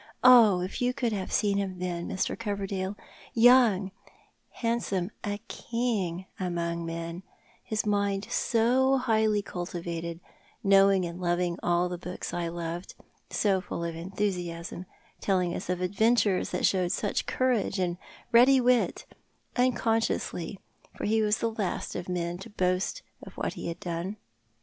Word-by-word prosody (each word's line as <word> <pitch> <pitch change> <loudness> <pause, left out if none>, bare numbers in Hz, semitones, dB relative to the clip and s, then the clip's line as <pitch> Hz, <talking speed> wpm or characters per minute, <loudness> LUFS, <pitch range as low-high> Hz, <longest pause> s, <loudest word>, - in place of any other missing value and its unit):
Oh, 230 -7 +8
if 185 +6 -4
you 250 0 +1
could 240 -5 0
have 195 -2 -3
seen 200 -2 +2
him 190 -2 -3
then, 175 -1 -3
Mr. 190 - -1
Coverdale 200 -3 -3 0.3
— - - -21 0.2
young, 215 -7 +4 0.6
handsome, 225 -5 -1
a 205 -1 -2
king 210 -7 -2
among 170 -2 -2
men 165 +1 -5 0.2
— - - -32
his 215 0 0
mind 200 -1 0
so 255 +4 +3
highly 220 -4 +2
cultivated— 170 -2 -5 0.5
kuowing 195 -2 +5
and 170 +1 -7
loviug 175 -1 0
all 175 +1 +2
the 180 -1 -5
books 180 +1 -6
I 175 -1 -1
loved. 170 +1 -5 0.3
So 195 -3 +1
full 170 - -5
of 170 -1 -3
enthusiasm—telling 180 0 -3
us - - -5
of 180 0 -1
adventures 205 +1 +2
that - - 0
showed 180 -2 +2
such 205 +1 -1
courage 245 -6 +1
and 180 -1 -1 0.3
ready 255 +3 +7
wit 250 -1 +2 0.3
— - - -43
unconsciously, 225 -6 0 0.4
for - - -3
he 220 +1 +2
was 210 +1 +2
the 230 - -1
last 210 -4 -3
of 180 +1 -5
men 175 -1 -2
to 195 - -9
boast 185 - -1 0.2
of - - -11
what - - -3
he - - -6
had 170 +1 -5
done. 175 +3 -4
190 Hz, 150 wpm, -28 LUFS, 175-220 Hz, 0.6 s, Oh